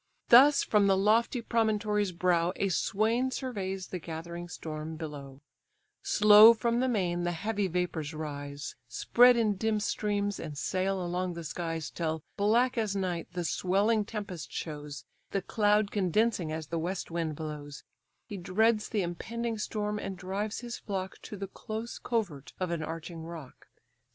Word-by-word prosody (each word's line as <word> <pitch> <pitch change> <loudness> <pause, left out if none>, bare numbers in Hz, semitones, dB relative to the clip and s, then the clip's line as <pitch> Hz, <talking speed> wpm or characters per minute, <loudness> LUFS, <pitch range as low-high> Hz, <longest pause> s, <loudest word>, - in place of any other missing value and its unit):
Thus 275 +5 +8
from 210 -2 +3
the 195 -1 +4
lofty 225 +4 +2
promontory's 210 -3 +1
brow 175 0 +1
A 200 - 0
swain 220 +7 +1
surveys 195 -8 -4
the 180 - -4
gathering 170 +1 -7
storm 155 -1 -6
below; 145 -4 -8 0.6
Slow 210 +2 +8
from 235 +1 0
the 260 - +2
main 180 -7 0
the 175 - 0
heavy 205 +3 -1
vapours 175 -4 -2
rise, 145 -2 -6
Spread 245 - +5
in 215 -4 +1
dim 220 +1 +1
streams, 205 -1 -1
and 150 -3 -6
sail 185 +3 -1
along 180 0 -2
the 170 - -6
skies, 165 0 -4
Till 160 -2 -2
black 235 +5 +2
as 210 -3 -1
night 180 -4 -2
the 175 -1 -2
swelling 200 +7 +2
tempest 205 -6 -6
shows, 150 -2 -6 0.2
The 195 -2 -2
cloud 210 0 +2
condensing 200 -2 +1
as 160 0 -4
the 165 - -1
west 175 +2 -3
wind 165 -2 -2
blows: 150 -2 -7 0.4
He 205 - -7
dreads 210 +5 +1
the 210 -4 0
impending 225 +6 -4
storm, 210 0 -2
and 195 -2 -5
drives 195 +5 -3
his 240 -1 -6
flock 190 -2 -4
To 210 - -8
the 195 - -4
close 220 +4 -6
covert 190 - -3
of 185 -2 -1
an 170 -2 -2
arching 165 +1 -6
rock. 160 -4 -10
190 Hz, 155 wpm, -30 LUFS, 165-215 Hz, 0.6 s, Thus